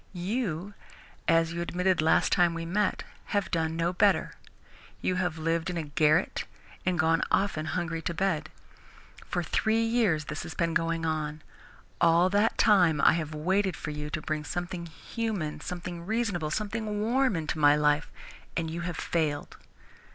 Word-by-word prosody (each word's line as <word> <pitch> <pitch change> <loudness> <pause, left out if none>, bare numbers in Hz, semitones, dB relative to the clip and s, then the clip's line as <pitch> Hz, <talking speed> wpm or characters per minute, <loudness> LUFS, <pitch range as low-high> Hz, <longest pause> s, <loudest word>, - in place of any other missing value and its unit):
You, 190 -1 -2 0.5
as 165 0 +3
you 170 - -3
admitted 180 0 +1
last 160 - +3
time 175 -2 +3
we 165 0 -4
met, 200 +4 0 0.2
have 200 -3 -1
done 160 -1 0
no 170 +2 0
better. 200 +2 +2 0.7
You 185 - 0
have 175 -3 -1
lived 165 +2 -1
in 180 - -3
a 165 - -1
garret 155 +4 +2 0.4
and 180 -1 +2
gone 160 0 +3
often 165 -6 +1
hungry 165 -1 -2
to 170 - -3
bed. 175 -4 0 0.8
For - - -1
three 225 0 +1
years 225 -10 +2
this 150 0 -5
has 160 - -7
been 170 -1 0
going 165 -1 0
on. 155 -1 -2 0.6
All 170 +2 +5
that 205 +3 +2
time 175 -8 +5
I - - +6
have 155 -2 -3
waited 185 +3 +1
for 150 - -5
you 150 0 -5
to 155 0 -4
bring 155 -1 -2
something 175 +2 -4
human, 190 -1 -4
something 175 -1 -6
reasonable, 205 -6 -1
something 215 +3 -2
warm 250 +1 +2
into 160 -1 -2
my 145 0 +6
life, 150 0 +2 0.5
and 165 -2 -1
you 170 +1 -4
have 170 -1 -4
failed. 150 -3 -1
170 Hz, 165 wpm, -28 LUFS, 155-190 Hz, 0.8 s, I